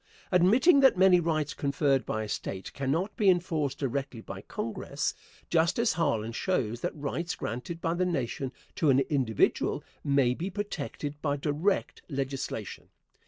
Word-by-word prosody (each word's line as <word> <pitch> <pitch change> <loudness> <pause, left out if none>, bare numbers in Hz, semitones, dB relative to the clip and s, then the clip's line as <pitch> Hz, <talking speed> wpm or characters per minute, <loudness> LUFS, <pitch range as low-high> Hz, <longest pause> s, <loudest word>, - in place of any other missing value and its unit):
Admitting 225 - +5
that 265 -7 +6
many 185 -1 +6
rights 155 -3 0
conferred 140 -1 +1
by 110 - -1
a - - -5
State 95 -2 -5
cannot 155 +9 -1
be 205 -3 +4
enforced 165 -6 +1
directly 135 -2 -3
by - - -8
Congress, - - -3 0.3
Justice 170 +8 +2
Harlan 115 -9 0
shows 120 - -1
that - - -2
rights 155 +4 -3
granted 125 +9 -5
by 165 0 0
the 175 +1 0
Nation 135 -4 -2 0.2
to 155 - +1
an 135 0 +5
individual 125 -7 +1 0.2
may 140 -3 +3
be 175 +9 -4
protected 150 -7 -5
by 145 -2 0
direct 155 +7 0
legislation. 135 -2 -4
145 Hz, 145 wpm, -29 LUFS, 135-175 Hz, 0.3 s, that